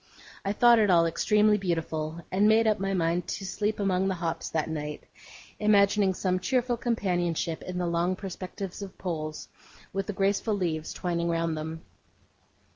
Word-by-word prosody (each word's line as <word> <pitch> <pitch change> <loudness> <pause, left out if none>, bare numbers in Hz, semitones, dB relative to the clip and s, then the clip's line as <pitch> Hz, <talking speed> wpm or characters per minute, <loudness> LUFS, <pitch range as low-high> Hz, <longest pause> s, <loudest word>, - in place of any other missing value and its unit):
I 195 - 0
thought 235 +2 +6
it 210 -2 +3
all 170 -2 +5
extremely 210 +5 +3
beautiful, 165 -2 -3
and 200 +3 +3
made 220 +1 +5
up 215 -1 +2
my 195 0 -1
mind 170 0 0
to 195 - -4
sleep 210 +3 -2
among 190 -1 +1
the 190 - 0
hops 170 -1 -3
that 160 -2 -1
night: 150 -1 -5 0.6
imagining 200 -2 +4
some 185 0 0
cheerful 250 +3 +1
companionship 175 -9 -1
in 180 0 -6
the 180 - 0
long 170 +2 +1
perspectives 190 0 -6
of 195 -1 -8
poles, 155 -4 -4 0.5
with 195 0 -2
the 210 - -2
graceful 200 +2 +1
leaves 165 -5 -2
twining 170 -1 -2
round 165 -1 0
them. 160 +1 -6
185 Hz, 165 wpm, -28 LUFS, 165-205 Hz, 0.6 s, thought